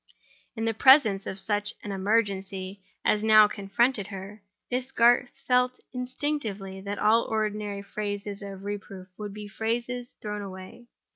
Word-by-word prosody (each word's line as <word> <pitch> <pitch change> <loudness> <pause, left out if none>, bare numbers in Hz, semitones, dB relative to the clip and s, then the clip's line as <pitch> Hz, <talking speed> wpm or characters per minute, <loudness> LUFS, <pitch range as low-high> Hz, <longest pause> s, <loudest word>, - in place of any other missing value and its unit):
In 225 -1 -2
the 225 - +1
presence 220 -5 +6
of 190 - -4
such 205 +1 -1
an 205 - -5
emergency 195 -1 -1 0.2
as 210 0 +2
now 215 -1 +8
confronted 205 +2 0
her, 200 +1 -8 0.3
Miss 255 +1 -2
Garth 240 +1 +4 0.2
felt 250 0 +3
instinctively 250 -7 -3
that 200 +1 -4
all 225 +2 +4
ordinary 210 -2 -2
phrases 205 0 -4
of 195 -1 -8
reproof 200 -2 -6
would 210 -1 -5
be 210 +1 -8
phrases 240 +3 -3
thrown 210 -1 -4
away. 190 +4 -9
210 Hz, 140 wpm, -27 LUFS, 200-230 Hz, 0.3 s, now